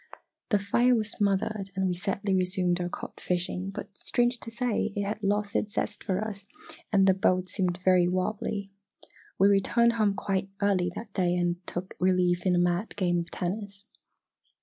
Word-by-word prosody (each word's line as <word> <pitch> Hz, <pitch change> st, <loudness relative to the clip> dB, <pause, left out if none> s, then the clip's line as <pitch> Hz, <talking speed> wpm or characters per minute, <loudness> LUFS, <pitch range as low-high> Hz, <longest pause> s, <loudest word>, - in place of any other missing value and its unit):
The 210 Hz, -, +4 dB
fire 240 Hz, +5 st, +3 dB
was 220 Hz, -1 st, -1 dB
smothered 200 Hz, 0 st, 0 dB
and 190 Hz, 0 st, 0 dB
we 180 Hz, -, +1 dB
sadly 195 Hz, +2 st, -2 dB
resumed 180 Hz, -1 st, +1 dB
our 175 Hz, -, -2 dB
cod -, -, -7 dB
fishing, 180 Hz, +1 st, -2 dB
but 195 Hz, 0 st, -8 dB
strange 240 Hz, +3 st, 0 dB
to 230 Hz, -, -8 dB
say, 230 Hz, -2 st, -1 dB
it 205 Hz, -, 0 dB
had 210 Hz, +2 st, -3 dB
lost 205 Hz, 0 st, 0 dB
its 210 Hz, -, -1 dB
zest 205 Hz, 0 st, -2 dB
for 190 Hz, -1 st, 0 dB
us 205 Hz, -2 st, -5 dB, 0.4 s
and 195 Hz, -2 st, +5 dB
the 190 Hz, -, +6 dB
boat 185 Hz, -1 st, +1 dB
seemed 180 Hz, -1 st, -1 dB
very 180 Hz, -2 st, +5 dB
wobbly. 195 Hz, +2 st, -2 dB, 0.7 s
We 195 Hz, -, +5 dB
returned 235 Hz, +4 st, +3 dB
home 215 Hz, -3 st, +2 dB
quite 195 Hz, -1 st, -1 dB
early 190 Hz, -3 st, +2 dB
that 215 Hz, -3 st, -8 dB
day 180 Hz, -2 st, +1 dB
and 175 Hz, 0 st, 0 dB
took 185 Hz, +2 st, -5 dB
relief 180 Hz, 0 st, +2 dB
in 180 Hz, -, +4 dB
a -, -, +2 dB
mad 175 Hz, +4 st, 0 dB
game 175 Hz, -3 st, +1 dB
of 170 Hz, 0 st, -5 dB
tennis. 200 Hz, +2 st, -4 dB
195 Hz, 180 wpm, -28 LUFS, 180-205 Hz, 0.7 s, the